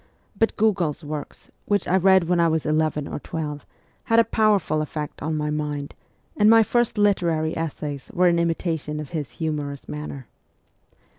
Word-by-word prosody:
But 225 +3 +1
Gogol's 180 -8 +1
works, 150 -1 -7
which 205 -1 0
I 180 - +2
read 190 0 +5
when 175 0 +2
I 170 - +4
was 160 -1 0
eleven 155 -1 0
or - - -5
twelve, 150 -1 -5 0.4
had 225 - +2
a - - +7
powerful 210 -9 +2
effect 150 -1 -5
on 155 +1 -2
my 150 0 -1
mind, 150 -1 -3 0.4
and 210 0 +4
my 225 0 +7
first 240 +1 0
literary 170 -6 +1
essays 150 -3 -4
were 180 +1 +3
in 170 -1 +3
hnitation 165 -2 -1
of 150 -3 -6
his 155 -5 -5
humorous 150 -3 -4
manner. 150 -3 -6
160 Hz, 165 wpm, -23 LUFS, 150-190 Hz, 0.4 s, a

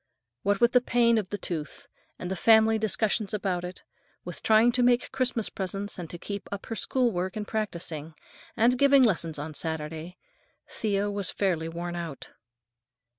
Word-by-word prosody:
What 200 +4 +1
with 235 0 +4
the 250 - +5
pain 235 -2 +3
of 195 -3 -5
the 205 - -3
tooth, 160 -6 -5 0.3
and 180 +1 -4
family 220 +2 +5
discussions 215 -1 0
about 185 -4 -1
it, 180 +1 -8 0.4
with 175 -4 -6
trying 220 +2 +5
to 250 - +1
make 245 0 +3
Christmas 245 -4 0
presents 195 +1 -2
and 170 -3 -6
to 175 - -6
keep 200 +3 -6
up 200 -1 -5
her 225 - -4
school 250 +1 +1
work 185 0 -3
and 210 -1 -4
practicing, 170 -7 -4 0.4
and 240 +2 +3
giving 280 -1 +6
lessons 170 -8 +1
on 150 +2 -5
Saturdays, 160 +2 -4 0.5
Thea 205 -1 -1
was 200 -2 -1
fairly 170 -5 0
worn 175 +1 -5
out. 165 -5 -6
200 Hz, 170 wpm, -27 LUFS, 175-225 Hz, 0.5 s, giving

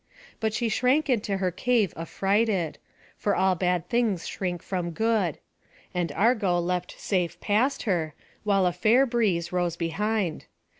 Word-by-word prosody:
But 220 -1 0
she 235 - 0
shrank 255 +6 +2
into 205 -4 0
her 185 -1 0
cave 220 0 +1
affrighted; 195 +1 0 0.4
for 205 - 0
all 190 0 +3
bad 180 -1 0
things 230 -7 0
shrink 180 -3 -3
from 180 -3 -2
good; 215 -5 +1 0.6
and 175 -3 -1
Argo 210 -4 +2
leapt 180 +1 -2
safe 180 -4 -1
past 230 +7 +1
her, 165 -8 -1 0.3
while 200 -3 +3
a 180 - +2
fair 225 +9 +4
breeze 205 -9 0
rose 175 -2 0
behind. 185 +1 -1
195 Hz, 145 wpm, -26 LUFS, 175-220 Hz, 0.6 s, fair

